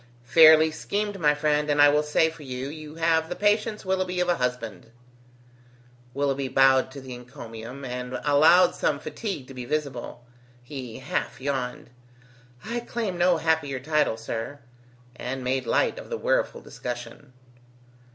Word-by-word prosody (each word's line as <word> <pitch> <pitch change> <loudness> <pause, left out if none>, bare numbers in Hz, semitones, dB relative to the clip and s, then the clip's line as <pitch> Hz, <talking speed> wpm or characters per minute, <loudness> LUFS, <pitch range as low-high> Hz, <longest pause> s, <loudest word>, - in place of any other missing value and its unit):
"Fairly 160 +2 +7
schemed, 205 +5 -3
my 150 -2 +3
friend, 150 0 +1
and 145 0 +1
I 145 0 +8
will 150 +1 +3
say 150 +2 +2
for 160 - -14
you, 130 -1 -5
you 155 0 -9
have 165 0 +1
the 180 - -3
patience, 210 +1 +1
Willoughby, 185 -1 -1
of 180 0 +1
a 175 - +2
husband!" 125 -3 -3 1.3
Willoughby 140 -1 0
bowed 130 0 +4
to 140 +1 -10
the 130 -1 -8
encomium, 120 +1 -9
and 125 0 -4
allowed 155 +5 +5
some 145 - 0
fatigue 155 - -5
to 135 - -10
be 125 -1 -6
visible. 125 -3 -4 0.4
He 125 -3 -7
half 135 +2 -3
yawned: 130 -3 -3 0.7
"I 235 +2 -2
claim 230 -5 -3
no 175 0 +4
happier 160 -4 0
title, 150 -4 +1
sir," 115 +5 -5 0.5
and 130 +1 -5
made 130 +1 -1
light - - +1
of - - -11
the 470 - -3
weariful - - 0
discussion. 135 -3 -8
145 Hz, 150 wpm, -25 LUFS, 130-165 Hz, 1.3 s, I